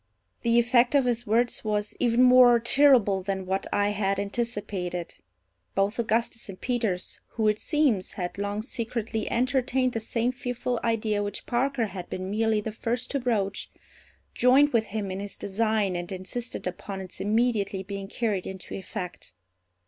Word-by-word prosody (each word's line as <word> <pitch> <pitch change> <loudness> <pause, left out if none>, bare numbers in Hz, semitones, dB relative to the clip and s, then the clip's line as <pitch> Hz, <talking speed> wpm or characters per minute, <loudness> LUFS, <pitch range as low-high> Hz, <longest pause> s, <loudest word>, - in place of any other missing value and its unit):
The 235 0 +2
effect 240 +2 +4
of 275 -2 +4
his 240 -1 0
words 235 +3 +1
was 210 -1 -1
even 240 0 +3
more 250 -1 +7
terrible 235 -6 +4
than 190 0 -3
what 190 +1 -1
I 205 0 +2
had 200 -1 0
anticipated. 200 -5 -3 0.6
Both 200 +4 +1
Augustus 230 0 0
and 185 - -8
Peters, 225 -8 -2
who, 220 -2 +1
it 210 0 +2
seems, 280 - +1
had 180 +1 -5
long 205 +1 -2
secretly 230 -2 -3
entertained 255 0 +1
the 225 - -1
same 230 +2 -1
fearful 245 -1 -3
idea 215 -2 0
which 205 -1 -4
Parker 250 0 0
had 185 -4 -7
been 185 +1 -4
merely 220 0 +1
the 220 - -4
first 235 +3 -3
to 280 - 0
broach, 205 -6 -1 0.6
joined 270 +3 +5
with 225 -2 +3
him 205 -2 -4
in 190 - -4
his 200 0 -6
design 210 -1 0
and 175 +1 -4
insisted 195 +6 -4
upon 190 +2 -5
its 185 -1 -6
immediately 210 -2 +1
being 195 0 -6
carried 205 -3 -2
into 190 -1 -8
effect. 180 - -6
220 Hz, 160 wpm, -27 LUFS, 195-240 Hz, 0.6 s, more